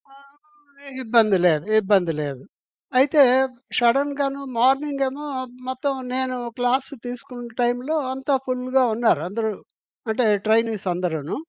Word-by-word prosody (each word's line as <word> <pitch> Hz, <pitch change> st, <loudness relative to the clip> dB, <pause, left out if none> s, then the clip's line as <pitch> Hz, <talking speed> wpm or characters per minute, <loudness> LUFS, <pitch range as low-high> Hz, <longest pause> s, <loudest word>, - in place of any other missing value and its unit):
ఆహ్, 285 Hz, 0 st, -20 dB
ఇబ్బంది 220 Hz, -4 st, +4 dB
లేదు. 160 Hz, -1 st, +3 dB, 0.2 s
ఇబ్బంది 190 Hz, -5 st, +2 dB
లేదు. 140 Hz, -3 st, -5 dB, 0.6 s
అయితే, 285 Hz, +2 st, +5 dB, 0.6 s
షడెన్‌గాను 275 Hz, +3 st, +1 dB, 0.2 s
మార్నింగ్ 275 Hz, +3 st, +2 dB
ఏమో 290 Hz, +3 st, -8 dB, 0.4 s
మొత్తం 260 Hz, +2 st, -2 dB, 0.2 s
నేను 260 Hz, -1 st, -1 dB, 0.2 s
క్లాస్ 245 Hz, +2 st, 0 dB, 0.2 s
తీసుకున్న 245 Hz, 0 st, -8 dB
టైంలో 245 Hz, +6 st, 0 dB, 0.2 s
అంతా 270 Hz, +1 st, 0 dB
ఫుల్‌గా 255 Hz, +1 st, +1 dB
ఉన్నారు. 225 Hz, -10 st, +2 dB
అందరూ 220 Hz, +1 st, -2 dB, 0.6 s
అంటే 230 Hz, +2 st, +1 dB, 0.2 s
ట్రైనీస్ 220 Hz, -2 st, +1 dB
అందరూను. 165 Hz, -4 st, -3 dB
250 Hz, 110 wpm, -22 LUFS, 220-275 Hz, 0.6 s, అయితే